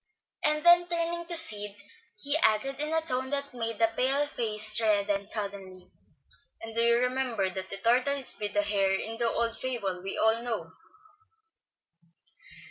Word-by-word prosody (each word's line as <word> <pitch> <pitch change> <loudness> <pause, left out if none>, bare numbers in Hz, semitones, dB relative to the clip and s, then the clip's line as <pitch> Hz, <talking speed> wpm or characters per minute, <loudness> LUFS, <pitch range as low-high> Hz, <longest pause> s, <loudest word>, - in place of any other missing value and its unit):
Then 345 +4 +4
turning 340 0 -2
to 340 -1 +2
Sid 210 -10 +2 0.4
he 285 +1 +2
added, 270 0 +2
in 300 +1 -1
a 320 0 +1
tone 260 -4 0
that 280 -1 -3
made 230 -2 -4
the 225 0 +2
pale 270 +4 +1
face 215 -4 0
redden 205 -2 0
suddenly, 195 -3 -6 0.7
"And 225 0 -9
do 230 - +1
you 235 0 +4
remember 250 -6 -1
that 190 +1 -7
the 195 - -6
tortoise 255 +5 +3
beat 210 -1 -6
the 205 - +2
hare 195 -2 +1
in 225 +3 -5
the 235 -1 +1
old 230 0 -1
fable 205 -9 -4
we 195 +1 -6
all 220 +1 +2
know." 235 -1 -5
230 Hz, 155 wpm, -28 LUFS, 205-275 Hz, 0.7 s, Then